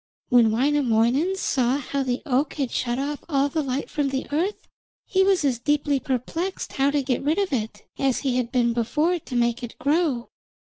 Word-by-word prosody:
When 240 -3 +5
Wainamoinen 260 +5 +2
saw 260 -8 +1
how 280 0 -3
the 250 -2 -2
oak 275 +3 0
had 275 -5 -2
shut 240 0 -1
off 285 +2 -3
all 280 -2 +2
the 310 +2 -1
light 270 0 -2
from 290 -2 -1
the 270 0 -2
earth, 350 +8 -1 0.4
he 380 0 +2
was 380 -5 +3
as 255 -4 +1
deeply 290 +1 +1
perplexed 300 +9 -3
how 270 +1 +2
to 285 -1 0
get 255 -2 -1
rid 300 +4 +1
of 395 -6 0
it, 215 -4 -3 0.2
as 270 -2 +1
he 260 -3 0
had 245 -2 -1
been 240 -3 +2
before 300 +9 +1
to 260 - -8
make 235 0 +1
it 240 -2 -7
grow. 285 -4 0
275 Hz, 195 wpm, -24 LUFS, 245-295 Hz, 0.4 s, When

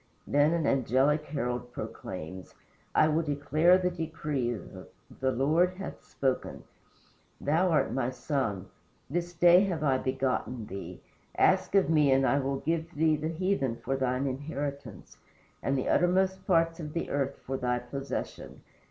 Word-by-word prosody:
Then 145 +2 +3
an 170 -2 0
angelic 135 +4 +2
herald 125 -3 -3
proclaims: 90 +4 -7 0.4
"I - - +5
will 155 +1 +2
declare 155 +4 +3
the 180 -1 0
decree. 150 - -2 0.6
The 130 0 +1
Lord 160 +8 +2
hath 195 +1 -7
spoken: 135 -2 -2 0.8
Thou 165 +6 +2
art 160 - +2
my 125 -2 0
Son; 125 - -2 0.5
This 175 +2 -2
day 175 +2 +6
have 170 -5 -2
I 135 -3 +2
begotten 130 -3 -2
thee: 95 -3 -8 0.4
Ask - - +3
of 195 - +5
me 150 -3 +4
and 135 0 +4
I 130 +3 +3
will 135 0 -2
give 165 0 -2
the 155 +1 +3 0.2
heathen 165 -7 0
for 135 +3 -3
thine 130 0 0
inheritance, 140 - -5 0.4
And 135 0 0
the 130 - -2
uttermost 190 +2 +2
parts 165 -2 +2
of 150 -2 -6
the 170 - -3
earth 140 -1 -1
for 135 - -3
thy 125 -1 0
possession." 135 +2 -6
140 Hz, 145 wpm, -29 LUFS, 130-165 Hz, 0.8 s, day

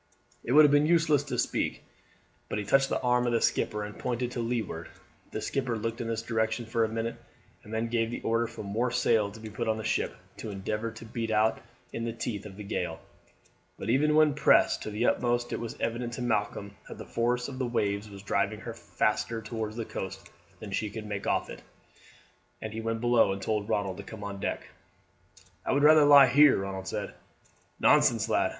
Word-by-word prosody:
It 120 - -1
would 155 +1 +9
have 145 - +4
been 145 +1 +4
useless 160 -4 +4
to 145 - -3
speak, - - -1 0.7
but - - -2
he 105 - -3
touched 135 +5 +3
the - - 0
arm 125 0 +2
of 120 - +1
the 115 - +3
skipper 105 0 0
and 105 0 -8
pointed 125 0 -2
to 125 - -4
leeward. 115 -8 -3 0.4
The - - -5
skipper 130 -4 -1
looked 115 +2 -3
in 115 - -3
this 115 0 -2
direction 110 0 -1
for 115 0 0
a 110 - 0
minute 115 +1 -3 0.5
and 105 - -12
then 110 +1 -1
gave 115 -1 0
the 120 - -5
order 115 +1 +1
for 115 -1 -8
more 110 +5 -1
sail 115 -4 +2
to 105 +2 -12
be 110 -1 -8
put 115 +2 -3
on 110 0 +1
the 110 - -5
ship, - - -1 0.2
to 110 - -6
endeavour 105 +3 -3
to 115 0 -11
beat 115 0 -4
out 110 0 +2 0.3
in 115 - -3
the 115 -1 -2
teeth 110 -3 -4
of 95 -1 -12
the 105 - -7
gale. 100 - -3 0.8
But 105 - -2
even 150 +4 +3
when 155 -1 +5
pressed 150 - +4
to - - -4
the 105 +3 -1
utmost 120 0 +1
it - - -2
was 115 -1 -6
evident 120 +1 -2
to 125 - -4
Malcolm 105 -3 -1
that - - -8
the - - -8
force 120 +1 0
of 135 -2 -7
the 130 - 0
waves 105 -3 -1
was 100 -1 -11
driving 95 - 0
her - - -6
faster 110 +2 -1
towards 110 -1 -5
the 115 -1 -4
coast 95 0 -7 0.3
than 110 -3 -8
she 105 +2 -1
could 110 +1 -7
make 100 -1 -4
off - - +1
it, - - -9 1.0
and 110 -1 -6
he 110 - -4
went 115 0 -2
below 120 -5 +4
and 100 - -5
told 105 0 -1
Ronald 100 -4 -1
to - - -7
come 110 -2 -9
on 100 -1 -5
deck. - - -3 1.0
"I - - -1
would 140 +1 +2
rather 155 0 +7
lie 145 -1 +9
here," 145 +2 +6
Ronald 95 -1 -4
said. - - -4 0.7
"Nonsense, - - +4
lad! - - +2
115 Hz, 220 wpm, -29 LUFS, 105-120 Hz, 1.0 s, would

